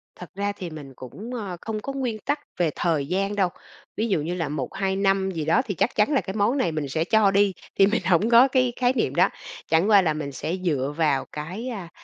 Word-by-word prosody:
Thật 180 Hz, -, -10 dB
ra 200 Hz, +1 st, -1 dB
thì 190 Hz, -3 st, -7 dB
mình 145 Hz, -4 st, -10 dB
cũng, 205 Hz, -, -9 dB
ờ, 200 Hz, -7 st, -5 dB
không 220 Hz, -1 st, -4 dB
có 275 Hz, +6 st, -5 dB
nguyên 250 Hz, -5 st, -2 dB
tắc 290 Hz, -, 0 dB, 0.2 s
về 170 Hz, -2 st, +3 dB
thời 160 Hz, -5 st, 0 dB
gian 195 Hz, +4 st, -1 dB
đâu. 190 Hz, -3 st, +2 dB, 0.5 s
Ví 220 Hz, -, 0 dB
dụ 190 Hz, -8 st, +1 dB
như 165 Hz, +4 st, -3 dB
là 165 Hz, -5 st, -2 dB
1-2 190 Hz, +7 st, -2 dB
năm 195 Hz, -1 st, +1 dB
gì 160 Hz, -4 st, -3 dB
đó 170 Hz, -, +3 dB
thì 200 Hz, -, -3 dB
chắc -, -, 0 dB
chắn 210 Hz, +6 st, +3 dB
là 275 Hz, -, +3 dB
cái 190 Hz, -, -6 dB
món 220 Hz, +6 st, +2 dB
này 180 Hz, -11 st, +1 dB
mình 155 Hz, -2 st, -3 dB
sẽ 160 Hz, +4 st, 0 dB
cho 210 Hz, +2 st, +3 dB
đi, 200 Hz, 0 st, +3 dB, 0.3 s
thì 195 Hz, -, +8 dB
mình 210 Hz, -, 0 dB
hổng 190 Hz, +4 st, +3 dB
có 240 Hz, +3 st, +7 dB
cái 255 Hz, -2 st, +1 dB
khái 250 Hz, 0 st, +3 dB
niệm -, -, -1 dB
đó, -, -, +4 dB, 0.4 s
chẳng 165 Hz, +6 st, +3 dB
qua 205 Hz, -2 st, +7 dB
là 160 Hz, -4 st, +1 dB
mình 150 Hz, -2 st, -4 dB
sẽ 160 Hz, +6 st, -3 dB
dựa 145 Hz, -4 st, 0 dB
vào 150 Hz, -5 st, +1 dB
cái, 180 Hz, +11 st, -6 dB
à, 195 Hz, -8 st, -6 dB
195 Hz, 250 wpm, -24 LUFS, 160-215 Hz, 0.5 s, thì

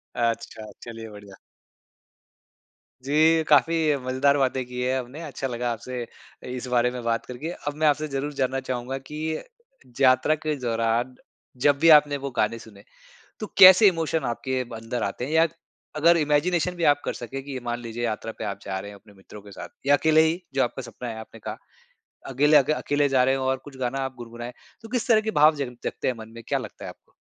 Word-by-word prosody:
अच्छा, 115 Hz, -2 st, -2 dB
चलिए 115 Hz, -1 st, -8 dB
बढ़िया। 100 Hz, -2 st, -12 dB, 1.7 s
जी, 155 Hz, +4 st, +3 dB
काफ़ी 155 Hz, +1 st, +3 dB
मजेदार 140 Hz, +2 st, +2 dB
बातें 130 Hz, -1 st, 0 dB
की 125 Hz, 0 st, -6 dB
हैं 130 Hz, +1 st, 0 dB
हमने 130 Hz, +6 st, -8 dB
अच्छा 135 Hz, -3 st, -4 dB
लगा 120 Hz, -1 st, -2 dB
आपसे 125 Hz, +2 st, -5 dB
इ -, -, -16 dB
इस 125 Hz, 0 st, -5 dB
बारे 125 Hz, 0 st, +2 dB
में 125 Hz, -1 st, -6 dB
बात 115 Hz, -1 st, -1 dB
करके। 125 Hz, +6 st, -6 dB, 0.2 s
अब 145 Hz, -, 0 dB
मैं 155 Hz, 0 st, +2 dB
आपसे 150 Hz, +1 st, +1 dB
ज़रूर 140 Hz, +1 st, -3 dB
जानना 135 Hz, -1 st, -1 dB
चाहूँगा 130 Hz, 0 st, -4 dB
कि 155 Hz, +4 st, -5 dB, 0.6 s
यात्रा 130 Hz, +3 st, +4 dB
के 155 Hz, 0 st, -3 dB
दौरान 115 Hz, +1 st, -1 dB, 0.5 s
जब 145 Hz, +1 st, +4 dB
भी 165 Hz, -, +5 dB
आपने 150 Hz, -2 st, +6 dB
वो 140 Hz, -1 st, -5 dB
गाने 110 Hz, +2 st, +1 dB
सुने, 105 Hz, -3 st, -15 dB, 0.6 s
तो 215 Hz, -, -4 dB
कैसे 190 Hz, +3 st, +10 dB
इमोशन 165 Hz, -3 st, 0 dB
आपके 130 Hz, +2 st, -2 dB
अंदर 115 Hz, 0 st, -5 dB
आते 100 Hz, +5 st, -3 dB
हैं 145 Hz, -, -6 dB
या 160 Hz, +1 st, +4 dB, 0.5 s
अगर 170 Hz, +3 st, +5 dB
इमेजिनेशन 165 Hz, +4 st, +1 dB
भी 175 Hz, -, -4 dB
आप 145 Hz, -2 st, +4 dB
कर -, -, -1 dB
सकें, 130 Hz, +3 st, -6 dB
कि 140 Hz, -, -9 dB
ये 130 Hz, -, -4 dB
मान 120 Hz, 0 st, -3 dB
लीजिए 115 Hz, 0 st, -6 dB
यात्रा 110 Hz, 0 st, -3 dB
पे -, -, -4 dB
आप 100 Hz, -1 st, -4 dB
जा 95 Hz, -1 st, -3 dB
रहे 100 Hz, -, -8 dB
हैं, 100 Hz, -, -12 dB
अपने 105 Hz, +1 st, -20 dB
मित्रों 100 Hz, +2 st, -13 dB
के 100 Hz, 0 st, -14 dB
साथ -, -, -8 dB, 0.2 s
या 145 Hz, +1 st, +6 dB
अकेले 160 Hz, +2 st, +4 dB
ही, 160 Hz, +3 st, +1 dB
जो 135 Hz, -, +2 dB
आपका 125 Hz, +2 st, -3 dB
सपना 120 Hz, 0 st, -8 dB
है 110 Hz, -, -6 dB
आपने 110 Hz, 0 st, -11 dB
कहा। -, -, -6 dB, 0.7 s
अकेले 145 Hz, +3 st, +4 dB
अ, -, -, +7 dB, 0.2 s
अकेले 145 Hz, -1 st, +1 dB
जा 130 Hz, -2 st, +3 dB
रहे 135 Hz, +1 st, +2 dB
हो 130 Hz, -1 st, -2 dB
और 130 Hz, 0 st, +1 dB
कुछ 140 Hz, -2 st, -11 dB
गाना 130 Hz, +1 st, -2 dB
आप 135 Hz, -1 st, -3 dB
गुनगुनाएँ, 120 Hz, 0 st, -8 dB, 0.3 s
तो 225 Hz, -, -11 dB
किस 245 Hz, 0 st, -2 dB
तरह 220 Hz, -2 st, +5 dB
के 220 Hz, -, -2 dB
भाव 155 Hz, +1 st, +7 dB
जग 135 Hz, -4 st, -4 dB
जगते -, -, -3 dB
हैं 125 Hz, -, 0 dB
मन 110 Hz, 0 st, -10 dB
में 115 Hz, -, -10 dB
क्या -, -, 0 dB
लगता -, -, -9 dB
है -, -, -5 dB
आपको? -, -, -16 dB
130 Hz, 215 wpm, -25 LUFS, 120-150 Hz, 1.7 s, कैसे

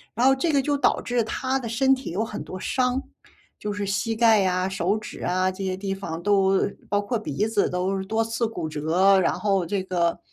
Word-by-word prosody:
然 240 Hz, +3 st, +2 dB
后 270 Hz, -, +6 dB
这 320 Hz, +5 st, 0 dB
个 280 Hz, -2 st, +3 dB
就 290 Hz, +2 st, 0 dB
导 280 Hz, -, +2 dB
致 245 Hz, -1 st, 0 dB
他 260 Hz, +4 st, -1 dB
的 235 Hz, -3 st, -5 dB
身 265 Hz, +4 st, +3 dB
体 265 Hz, 0 st, -4 dB
有 205 Hz, +6 st, -1 dB
很 210 Hz, -, -6 dB
多 185 Hz, -, -8 dB
伤， 250 Hz, +5 st, 0 dB, 0.6 s
就 210 Hz, -, -3 dB
是 205 Hz, 0 st, -3 dB
膝 225 Hz, +3 st, -1 dB
盖 220 Hz, -3 st, +5 dB
啊、 185 Hz, 0 st, +1 dB
手 190 Hz, +1 st, 0 dB
指 215 Hz, -, -8 dB
啊， 185 Hz, +1 st, +1 dB
这 190 Hz, +1 st, -7 dB
些 185 Hz, -1 st, -2 dB
地 195 Hz, 0 st, -3 dB
方 170 Hz, -4 st, -6 dB
都 195 Hz, -2 st, +3 dB, 0.2 s
包 205 Hz, -, +2 dB
括 220 Hz, +3 st, -2 dB
鼻 205 Hz, -1 st, -2 dB
子 220 Hz, -2 st, +1 dB
都 185 Hz, +2 st, -1 dB
多 220 Hz, +3 st, 0 dB
次 225 Hz, +1 st, -1 dB
骨 180 Hz, -8 st, -4 dB
折。 170 Hz, +6 st, +3 dB
然 185 Hz, -, +2 dB
后 195 Hz, -4 st, +1 dB
这 190 Hz, +2 st, -2 dB
个， 175 Hz, -2 st, 0 dB
200 Hz, 240 characters per minute, -24 LUFS, 185-230 Hz, 0.6 s, 后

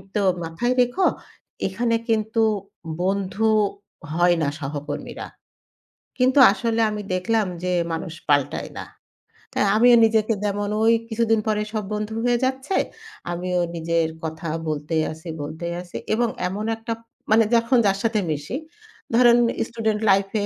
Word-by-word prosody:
তো 210 Hz, -, +2 dB, 0.2 s
"মাথায় 170 Hz, +10 st, -1 dB
রেখো 245 Hz, +10 st, +1 dB, 0.6 s
এখানে 230 Hz, +4 st, 0 dB
কিন্তু 220 Hz, 0 st, +1 dB, 0.6 s
বন্ধু 195 Hz, +3 st, 0 dB, 0.7 s
হয় 175 Hz, +1 st, +4 dB
না 150 Hz, -, +1 dB
সহকর্মীরা।" 145 Hz, 0 st, -5 dB, 0.9 s
কিন্তু 255 Hz, +2 st, +4 dB
আসলে 225 Hz, +3 st, 0 dB
আমি 210 Hz, 0 st, -4 dB
দেখলাম 210 Hz, +3 st, +1 dB, 0.2 s
যে 180 Hz, 0 st, 0 dB, 0.2 s
মানুষ 165 Hz, 0 st, -4 dB, 0.2 s
পাল্টায় 145 Hz, -1 st, +1 dB
না। -, -, -5 dB, 0.7 s
তাই -, -, +2 dB
আমিও 240 Hz, +2 st, +7 dB
নিজেকে 220 Hz, 0 st, +2 dB
যেমন 205 Hz, 0 st, -1 dB
ওই 225 Hz, +1 st, +5 dB, 0.2 s
কিছুদিন 225 Hz, -1 st, +2 dB
পরে 210 Hz, -1 st, +1 dB
সব 215 Hz, -1 st, -1 dB
বন্ধু 210 Hz, +1 st, -3 dB
হয়ে 245 Hz, 0 st, +3 dB
যাচ্ছে 265 Hz, +7 st, -2 dB, 0.6 s
আমিও 180 Hz, +1 st, -1 dB, 0.2 s
নিজের 165 Hz, 0 st, 0 dB
কথা 160 Hz, +1 st, -4 dB, 0.2 s
বলতেই 155 Hz, +1 st, -1 dB
আছি, 160 Hz, +2 st, -11 dB
বলতেই 160 Hz, +4 st, -5 dB
আছি 180 Hz, -1 st, -8 dB, 0.2 s
এবং 240 Hz, +2 st, +2 dB, 0.2 s
এমন 200 Hz, +4 st, -4 dB
একটা 225 Hz, +1 st, -4 dB, 0.4 s
মানে 225 Hz, +1 st, +6 dB
যখন 230 Hz, +2 st, +3 dB
যার 195 Hz, -1 st, +3 dB
সাথে 225 Hz, -1 st, +1 dB
মিশি 150 Hz, -, -3 dB, 0.6 s
ধরেন 240 Hz, 0 st, +6 dB, 0.3 s
student 220 Hz, -2 st, -1 dB
life 195 Hz, 0 st, +3 dB
210 Hz, 135 wpm, -23 LUFS, 170-230 Hz, 0.9 s, আমিও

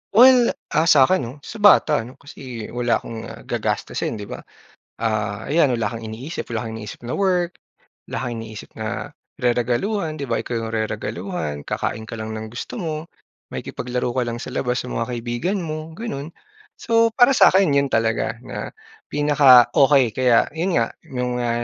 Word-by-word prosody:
Well, 250 Hz, +1 st, +7 dB, 0.2 s
ah, 155 Hz, +2 st, +2 dB
sa'kin 155 Hz, +3 st, +6 dB
'no. 120 Hz, -1 st, -5 dB
Sa 225 Hz, -, -8 dB
bata 195 Hz, -7 st, +6 dB
'no, 125 Hz, -, -13 dB
kasi 125 Hz, -6 st, -9 dB
wala 120 Hz, -1 st, +1 dB
akong 115 Hz, -1 st, -7 dB
ah, -, -, -10 dB
gagastusin -, -, -2 dB
'di 105 Hz, -, -6 dB
ba, -, -, -6 dB, 0.6 s
ah, 110 Hz, -2 st, -2 dB
ayan, 150 Hz, -2 st, +3 dB
wala 110 Hz, -, 0 dB
kang 115 Hz, -, -6 dB
iniisip, 115 Hz, +9 st, -6 dB
wala 115 Hz, 0 st, -2 dB
kang 110 Hz, -, -6 dB
iniisip 110 Hz, -1 st, -8 dB
na 125 Hz, -, -3 dB
work, 180 Hz, -3 st, +1 dB, 0.6 s
wala -, -, -3 dB
kang 120 Hz, -, -3 dB
iniisip 110 Hz, -2 st, -10 dB
na, 110 Hz, +7 st, -5 dB, 0.2 s
reregaluhan, 130 Hz, -, 0 dB
'di 140 Hz, -, -4 dB
ba, -, -, -1 dB
ikaw 120 Hz, -, -5 dB
'yong 115 Hz, 0 st, -4 dB
reregaluhan, 110 Hz, -, -3 dB
kakain 110 Hz, +8 st, -3 dB
ka 115 Hz, -, -6 dB
lang 110 Hz, 0 st, -5 dB
ng 110 Hz, 0 st, -6 dB
gusto 120 Hz, -, -7 dB
mo, 165 Hz, -8 st, -3 dB, 0.6 s
makikipaglaro 125 Hz, 0 st, -3 dB
ka 125 Hz, +1 st, 0 dB
lang 120 Hz, 0 st, -3 dB
sa -, -, -6 dB
labas, 125 Hz, 0 st, -1 dB
sa 125 Hz, -, -8 dB
mga 115 Hz, -, -2 dB
kaibigan 120 Hz, -, -2 dB
mo, 155 Hz, 0 st, -5 dB
gano'n. 165 Hz, -8 st, -6 dB, 0.4 s
So, 230 Hz, -1 st, +2 dB
para 245 Hz, 0 st, +6 dB
sa'kin 195 Hz, -, +5 dB
'yon 140 Hz, -, +2 dB
talaga, 115 Hz, 0 st, +1 dB
na -, -, -6 dB, 0.3 s
pinaka-okey 140 Hz, -2 st, +5 dB
kaya 125 Hz, +1 st, +3 dB
'yon 170 Hz, +4 st, -1 dB
nga, 115 Hz, -1 st, +2 dB, 0.2 s
'yong 125 Hz, -1 st, -3 dB
mga, 120 Hz, -1 st, 0 dB
125 Hz, 170 wpm, -22 LUFS, 115-165 Hz, 0.6 s, Well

